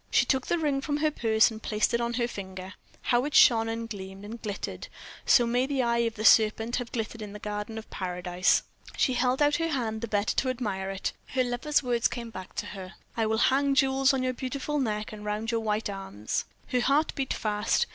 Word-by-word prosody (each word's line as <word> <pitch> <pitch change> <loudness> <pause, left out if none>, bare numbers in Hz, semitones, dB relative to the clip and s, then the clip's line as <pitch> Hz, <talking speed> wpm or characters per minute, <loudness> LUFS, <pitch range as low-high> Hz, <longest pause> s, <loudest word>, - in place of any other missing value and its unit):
She - - +4
took 265 -2 0
the 345 - +1
ring 290 -4 0
from 290 +1 -1
her 305 0 +1
purse 220 -4 +3
and 220 0 -8
placed 215 +1 0
it 235 - +2
on 235 0 -1
her 235 -1 +1
finger. 190 -4 -7 0.3
How 240 0 +2
it 295 - -3
shone, 225 -2 +6
and 230 0 -3
gleamed, 195 -2 -8
and 225 +3 -8
glittered! 205 -2 -5 0.4
So 240 - +6
may 245 +2 +1
the 270 -2 0
eye 235 0 +1
of 225 - -20
the 215 - -4
serpent 225 +2 +5
have 245 -2 -4
glittered 225 -1 -4
in 205 -1 -7
the - - -6
garden 210 +1 -5
of 220 - -7
Paradise. 180 0 +1 0.3
She 260 - +2
held 250 +3 +2
out 290 0 +3
her 330 0 -1
hand 225 -7 -2
the 235 - -3
better 205 -1 0
to 260 - +2
admire 205 -7 -2
it. 195 0 -3 0.2
Her 255 - +3
lover's 250 +5 0
words 240 -1 +2
came 235 -2 -6
back 185 -3 -9
to 210 - -3
her: 190 -2 -9 0.2
"I 225 -1 +1
will 220 0 +1 0.2
hang 275 0 +2
jewels 270 0 +4
on 265 -1 0
your 255 0 0
beautiful 275 +4 -3
neck 215 -4 -2
and 210 -1 -9
round 210 +2 -2
your 230 - +1
white 215 0 -1
arms." 195 - -4 0.2
Her 250 - +1
heart 285 +5 +2
beat 270 -2 -3
fast. 210 -1 +1
230 Hz, 225 wpm, -28 LUFS, 210-255 Hz, 0.4 s, shone